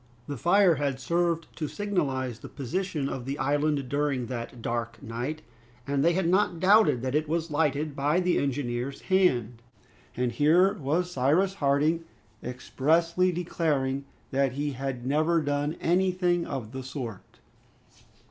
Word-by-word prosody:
The 145 - -5
fire 175 - +4
had 140 -2 -1
served 170 +3 0
to 155 - -2
signalize 140 - -2
the - - -10
position 150 +2 -3
of 130 -3 -5
the 135 +2 -3
island 145 0 0
during 140 -2 0
that 120 0 -6
dark 115 0 -3
night, 125 +8 -4 0.4
and 140 0 0
they 170 +2 +4
had 185 -1 +1
not 185 -1 +2
doubted 185 - +5
that 130 0 -2
it 155 +1 0
was 165 0 -1
lighted 145 -1 0
by 145 +5 +2
the 180 -1 +2
engineer's 135 -1 -2
hand; 125 - +1 0.6
and 125 -1 0
here 165 - +4
was 175 +1 -1
Cyrus 170 +7 +2
Harding 155 0 +1 0.4
expressly 165 +8 +1
declaring 145 -6 -1 0.3
that 135 -1 +1
he 145 +2 -2
had 130 -2 -4
never 155 +5 +2
done 145 +1 -1
anything 180 0 +1
of 125 -6 -5
the 130 0 -5
sort! 125 -6 -7
145 Hz, 145 wpm, -27 LUFS, 130-170 Hz, 0.6 s, doubted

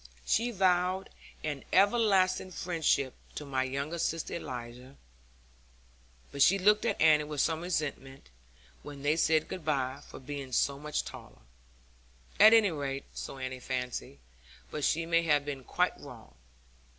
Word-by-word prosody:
She 235 +2 +1
vowed 185 -2 +1 0.3
an 145 -3 -4
everlasting 195 -2 +3
friendship 160 -7 0 0.2
to 150 - -5
my 135 -2 -1
younger 140 +6 -3
sister 165 0 -2
Eliza; 125 -2 -7 1.4
but 140 - -4
she 195 +7 +6
looked 210 +3 +3
at - - 0
Annie 155 -1 +5
with 150 -1 -5
some 160 +2 +1
resentment, 145 - -4 0.5
when 145 -1 -10
they 150 +2 +2
said 160 -1 +2
good 185 - -6
bye, 140 -2 -1
for - - -10
being 135 -1 -7
so 140 +3 +1
much 150 0 -3
taller. - - -11 1.0
At 215 +1 +9
any 220 -4 +5
rate 140 -3 -4
so - - -7
Annie 130 -1 -5
fancied, 125 - -4 0.5
but 150 - -4
she 165 +3 +1
may 165 0 +3
have 150 -3 +2
been 140 -3 -5
quite - - 0
wrong. - - -12
150 Hz, 145 wpm, -30 LUFS, 135-180 Hz, 1.4 s, At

